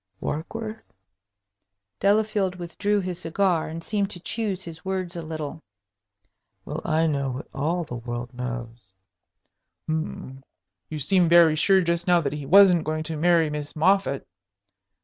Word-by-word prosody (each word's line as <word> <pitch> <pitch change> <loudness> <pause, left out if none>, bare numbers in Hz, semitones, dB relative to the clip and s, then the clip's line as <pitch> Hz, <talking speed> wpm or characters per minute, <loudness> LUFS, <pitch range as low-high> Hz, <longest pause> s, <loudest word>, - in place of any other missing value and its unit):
"Warkworth?" 215 +8 -5 1.1
Delafield 205 -2 +2
withdrew 200 +4 -1
his 180 -2 -4
cigar, 175 0 +1
and 165 +1 -6
seemed 200 0 -1
to 180 - -6
choose 195 0 -3
his 160 -1 -9
words 185 -2 -3
a 170 - -4
little. 155 -1 -6 1.0
"Well, 150 +2 -5
I 160 0 +2
know 140 -4 0
what 130 +2 -6
all 165 +5 -1
the 125 -6 -6
world 120 +1 -6
knows." 120 -5 -6 0.9
"Hm 155 -4 -4 0.5
you 155 - -4
seemed 175 +4 +2
very 170 -2 +7
sure 190 +4 +4
just 170 0 -1
now 175 -1 +5
that 140 -2 -2
he 145 -2 -6
wasn't 180 -1 +7
going 155 0 -2
to 160 0 -4
marry 165 -1 +3
Miss 150 -1 -5
Moffatt." 175 -3 +2
165 Hz, 145 wpm, -25 LUFS, 150-185 Hz, 1.1 s, very